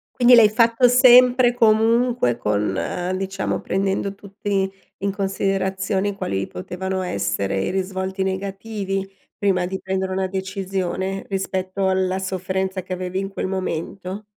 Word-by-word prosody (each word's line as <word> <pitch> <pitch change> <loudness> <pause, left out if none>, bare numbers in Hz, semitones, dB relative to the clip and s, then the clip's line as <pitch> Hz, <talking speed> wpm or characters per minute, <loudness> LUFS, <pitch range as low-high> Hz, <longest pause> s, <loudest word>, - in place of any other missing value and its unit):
Quindi 245 0 +7
l'hai 230 -3 +8
fatto 230 +3 +4
sempre 250 0 +6
comunque 225 - +3
con 105 -3 -1 0.4
diciamo 195 0 -2
prendendo 195 +1 -1
tutti 195 -1 -3 0.3
in 200 0 -1
considerazioni 195 0 -1
quali 95 - -2
potevano 190 - -4
essere 100 - -1
i - - -1
risvolti 190 0 -3
negativi, 195 0 -3 0.2
prima 195 -4 +1
di 190 +1 -4
prendere 190 0 -2
una 190 0 -1
decisione 190 0 -3
rispetto 190 0 -2
alla 190 0 0
sofferenza 190 0 -2
che 185 - -5
avevi 185 0 -4
in 195 0 -3
quel 195 - -4
momento? 190 +2 -4
190 Hz, 125 wpm, -22 LUFS, 185-200 Hz, 0.4 s, l'hai